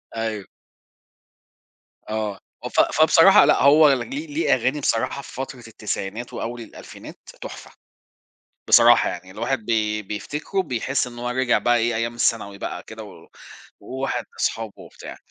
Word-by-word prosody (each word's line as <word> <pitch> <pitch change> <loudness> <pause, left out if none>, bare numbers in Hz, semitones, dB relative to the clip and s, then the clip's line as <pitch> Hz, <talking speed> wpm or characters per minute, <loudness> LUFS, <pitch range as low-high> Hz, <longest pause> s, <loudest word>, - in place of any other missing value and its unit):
أيوه. 110 -3 -3 1.6
آه، 110 -3 -3 0.4
ف - - +3 0.2
فبصراحة - - +7
لأ - - +3
هو 145 0 +7
ليه 275 - -4
ليه 300 - +1
أغاني 130 +4 0
بصراحة 135 +1 -1
في - - -13
فترة 130 -2 -7
التسعينات 110 +1 -5
وأوّل 120 +1 -5
الألفينات، 110 - -12 0.2
تحفة - - -9 1.0
بصراحة 120 0 +6
يعني، 90 +1 -8
الواحد 115 +2 -3
بي 105 -2 0
بيفتكرُه 150 - -3
بيحس 135 -3 -2
إن 120 -1 -10
هو 120 0 -3
رجع 125 0 +1
بقى 120 0 +2
إيه 115 0 0
أيّام 115 +1 -2
الثانوي 105 -4 0
بقى - - -6
كده، - - -10
و - - -13 0.6
و 130 +1 -8
واحد 135 - -2
وصحابه 110 -2 -2
وبتاع. - - -11
120 Hz, 140 wpm, -22 LUFS, 110-130 Hz, 1.6 s, فبصراحة